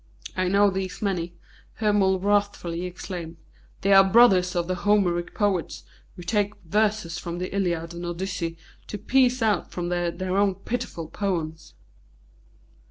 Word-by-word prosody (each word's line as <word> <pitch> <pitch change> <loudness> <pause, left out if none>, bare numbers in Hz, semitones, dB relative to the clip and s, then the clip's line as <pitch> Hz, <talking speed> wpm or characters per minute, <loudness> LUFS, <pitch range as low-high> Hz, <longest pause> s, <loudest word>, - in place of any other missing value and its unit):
"I 185 -1 0
know 200 +2 +4
these 190 +1 -4
many," 175 -4 -2 0.4
Hermon 205 -3 +2
wrathfully 195 -3 0
exclaimed. 175 -2 -7 0.4
"They 200 +1 +3
are 195 0 +9
the 190 - -1
brothers 190 -5 +5
of 170 -1 0
the 185 - 0
Homeric 180 -2 +1
poets, 200 -5 -1 0.3
who 175 - -9
take 205 +2 0
verses 205 -2 0
from 170 0 -5
the 185 +2 -4
Iliad 170 -4 -1
and 175 0 -6
Odyssey 175 -1 -3 0.3
to 210 - -5
piece 250 +3 +2
out 215 -2 +1
from 175 -1 -3
them 175 -1 -1
their 185 0 -2
own 200 -1 +3
pitiful 195 -5 -4
poems." 165 -4 -3
185 Hz, 150 wpm, -25 LUFS, 175-205 Hz, 0.4 s, are